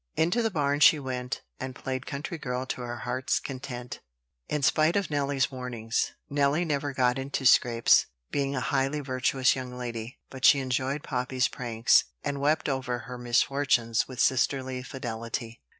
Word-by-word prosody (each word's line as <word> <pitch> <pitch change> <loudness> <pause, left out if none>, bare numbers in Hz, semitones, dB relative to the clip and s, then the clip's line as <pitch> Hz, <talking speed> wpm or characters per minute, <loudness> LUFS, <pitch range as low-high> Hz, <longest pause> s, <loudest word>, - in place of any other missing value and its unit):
Into 175 +9 +2
the 225 - +1
barn 145 -6 0
she 160 +1 +7
went, 130 -1 -4 0.2
and 130 -1 -5
played 130 0 -4
country 150 +4 -5
girl 125 -2 -3
to 130 - -4
her 120 0 -5
heart's 130 +1 -1
content, 125 -2 -7 0.5
in 150 -2 -1
spite 155 +4 +3
of 200 -5 0
Nelly's 140 -2 0
warnings. 120 -3 -2
Nelly 145 +4 +1
never 145 -2 -1
got 125 -1 +1
into 135 0 -3
scrapes, 120 -2 +5 0.2
being 140 0 -1
a 130 - -1
highly 135 +4 0
virtuous 130 -1 +1
young 125 -1 -6
lady; 120 -1 -5
but 130 -1 -9
she 145 - +8
enjoyed 130 +2 -1
Poppy's 125 -1 0
pranks, 115 -2 +2 0.2
and 140 -1 -2
wept 150 +2 +2
over 130 -3 -1
her 125 -1 -8
misfortunes 120 -1 +1
with 130 -1 -9
sisterly 130 0 +1
fidelity. 115 -2 -5
130 Hz, 160 wpm, -28 LUFS, 125-140 Hz, 0.5 s, she